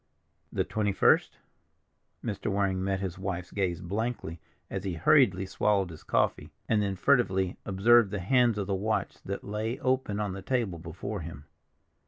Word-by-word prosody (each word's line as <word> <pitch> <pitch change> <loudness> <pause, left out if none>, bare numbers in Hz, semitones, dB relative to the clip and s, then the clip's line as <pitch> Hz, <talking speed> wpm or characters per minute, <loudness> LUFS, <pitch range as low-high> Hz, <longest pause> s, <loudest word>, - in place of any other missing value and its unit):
"The - - 0
twenty 105 -2 -1
first?" - - +3 0.9
Mr. 100 -4 -3
Waring 95 -2 0
met 95 0 -1
his 95 -1 -4
wife's 90 -2 -4
gaze 90 -3 -1
blankly 100 -3 -3 0.3
as 95 -1 -4
he 95 -3 -3
hurriedly 95 - +4
swallowed 95 -1 +1
his 80 - -11
coffee, - - 0 0.2
and 105 -2 +2
then 100 -1 -1
furtively 95 -5 +2
observed 105 +3 +5
the 105 - -3
hands 120 +4 +3
of 100 - -1
the 100 - -2
watch 105 +3 -1
that 100 +1 -5
lay 110 +4 -3
open 130 -5 0
on 105 -3 -2
the 95 - -6
table 110 -8 -1
before 90 +5 -5
him. 75 -3 -8
100 Hz, 165 wpm, -29 LUFS, 95-110 Hz, 0.9 s, observed